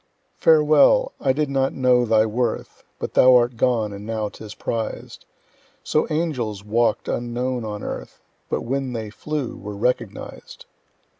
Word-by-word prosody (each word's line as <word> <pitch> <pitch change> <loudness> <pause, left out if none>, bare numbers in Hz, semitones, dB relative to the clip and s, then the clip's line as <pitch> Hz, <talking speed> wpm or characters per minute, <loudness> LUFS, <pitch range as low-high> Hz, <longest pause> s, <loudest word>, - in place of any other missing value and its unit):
Farewell! 155 - +5
I 135 - +2
did 150 +3 0
not 135 -1 0
know 125 -2 +3
thy 110 -1 +4
worth; 120 +3 -3
But - - -5
thou 130 0 +7
art 120 0 +3
gone, 115 -3 +1
and 100 0 -8
now 110 -1 -3
'tis 105 0 -11
prized: 115 -1 -5 0.6
So 155 - +1
angels 130 -11 -2
walk'd 115 +1 +1
unknown 120 +1 -2
on 105 -1 -5
earth, - - -6 0.3
But - - -1
when 135 +1 -2
they 110 -3 -5
flew 150 +2 -4
were 105 0 -8
recognized. 125 +4 -3
120 Hz, 145 wpm, -22 LUFS, 110-135 Hz, 0.6 s, thou